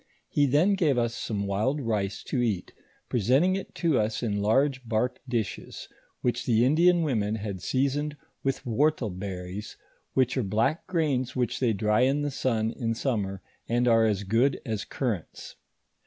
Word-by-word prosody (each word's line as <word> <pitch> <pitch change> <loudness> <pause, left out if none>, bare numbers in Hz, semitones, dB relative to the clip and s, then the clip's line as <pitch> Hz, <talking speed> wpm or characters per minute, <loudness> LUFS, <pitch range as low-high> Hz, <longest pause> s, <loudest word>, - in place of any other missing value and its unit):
He 145 -1 +3
then 155 +10 +4
gave 160 -9 +2
us 120 -1 +1
some 105 -3 -3
wild 110 +9 0
rice 105 -6 -2
to 125 - -1
eat, 105 -7 -1 0.3
presenting 130 - +3
it 195 - -6
to 165 -6 +2
us 110 +2 -1
in 105 -3 0
large 135 +5 +2
bark 120 +2 0
dishes, 115 -4 -3 0.3
which 120 0 -1
the 115 0 +4
In 135 - +3
dian 175 +1 +4
women 110 -8 0
had 100 -4 -5
seasoned 145 +3 0 0.3
with 135 -1 -1
whortleberries, 105 -7 -2 0.4
which 130 -2 +2
are - - +2
black 110 +10 0
grains 150 -8 0
which 125 -3 -1
they 125 -3 +2
dry 105 +1 +1
in 135 +3 +2
the 145 - -1
sun 115 -4 0
in 115 -2 -2
summer, 100 -7 -2 0.3
and 120 +1 +2
are 115 -1 +5
as 100 -2 0
good 120 +7 +2
as 110 -3 -3
currants. 115 - -4
120 Hz, 165 wpm, -27 LUFS, 105-140 Hz, 0.4 s, are